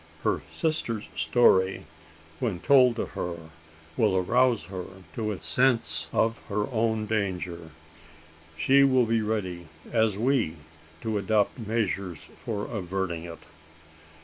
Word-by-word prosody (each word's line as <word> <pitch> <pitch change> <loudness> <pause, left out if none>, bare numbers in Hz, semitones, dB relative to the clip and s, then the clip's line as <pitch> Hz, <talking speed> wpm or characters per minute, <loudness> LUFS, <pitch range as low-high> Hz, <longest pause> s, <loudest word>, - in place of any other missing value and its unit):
Her - - +1
sister's 120 -9 -2
story, 95 -6 +3 0.5
when 110 -8 -1
told 125 +1 +5
to - - -2
her, 85 -2 -6 0.4
will 105 -4 +2
arouse 120 +5 +3
her 90 +1 -6 0.3
to 110 -2 -2
a 100 - -4
sense 90 -14 +1
of 115 0 +1
her 105 0 0
own 110 -2 0
danger. 90 -6 -2 0.9
She 140 +7 +5
will 130 -3 +4
be 115 0 +1
ready, 95 -6 -3 0.2
as 110 -3 +2
we, 115 - +1 0.5
to 110 -2 -1
adopt 105 +3 +1
measures 100 -6 -2
for 105 -4 -4
averting 95 -4 -3
it." 85 -1 -10
105 Hz, 120 wpm, -27 LUFS, 90-115 Hz, 0.9 s, told